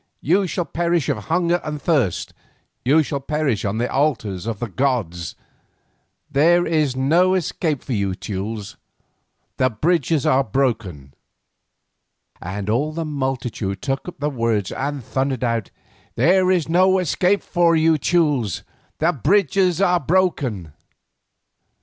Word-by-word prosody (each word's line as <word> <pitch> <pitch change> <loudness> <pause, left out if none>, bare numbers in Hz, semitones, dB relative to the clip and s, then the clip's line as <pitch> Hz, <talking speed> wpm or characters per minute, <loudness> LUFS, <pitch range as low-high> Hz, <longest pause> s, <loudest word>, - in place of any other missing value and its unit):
You 185 +6 +2
shall 175 0 -2
perish 170 0 0
of 105 -8 -2
hunger 175 0 +1
and 150 -1 -4
thirst, 135 - 0 0.5
you 150 +5 +4
shall 140 -1 -3
perish 140 -5 -1
on 100 +1 -1
the 120 +2 0
altars 115 -10 -1
of 115 -2 -2
the 120 - -4
gods. 105 - -2 1.0
There 170 +5 +4
is 155 -5 +1
no 170 +8 +3
escape 160 -5 -1
for 130 - -4
you 100 -3 -1
Teules; 105 +1 -5 0.8
the 130 - +3
bridges 155 +4 0
are 135 +1 +3
broken." 105 - -2 1.3
And 95 +3 -5
all 130 +8 0
the 165 0 -3
multitude 130 -9 -3
took 135 +4 -2
up 180 - -7
the 145 +1 -1
words 115 -6 -1
and 140 -1 -3
thundered 130 +1 -2
out, 115 -3 -1 0.5
"There 185 +2 +3
is 180 -4 +2
no 185 +3 +4
escape 185 +3 +1
for 170 -1 +2
you 160 -1 +3
Teules; 145 - +1 0.3
the 170 +3 +2
bridges 180 - +2
are 180 -2 +3
broken!" 135 - 0
140 Hz, 135 wpm, -21 LUFS, 115-170 Hz, 1.3 s, you